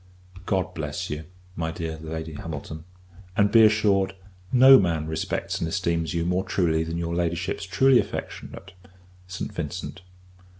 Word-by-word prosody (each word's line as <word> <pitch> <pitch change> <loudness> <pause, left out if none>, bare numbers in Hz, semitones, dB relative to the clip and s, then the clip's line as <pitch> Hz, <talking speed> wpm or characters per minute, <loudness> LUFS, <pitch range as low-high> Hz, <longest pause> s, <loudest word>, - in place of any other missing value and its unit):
God 95 -3 0
bless - - -4
you, 75 +1 -5 0.3
my 80 -1 -2
dear 80 -1 -5
Lady 80 0 -6
Hamilton; 80 +1 -7 0.5
and, 100 -1 +4
be 115 -1 +7
assured, 105 -3 +3 0.4
no 130 +1 +8
man 85 -4 0
respects 80 0 -3
and 85 - -1
esteems 85 -3 -1
you 85 0 0
more 90 +2 +1
truly 80 -5 +1
than 80 +1 -4
your 85 0 -2
Ladyship's 85 +3 -2
truly 130 +5 +5
affectionate - - -6 0.6
ST. 90 - -5
VINCENT. - - -5
85 Hz, 140 wpm, -25 LUFS, 80-95 Hz, 0.6 s, no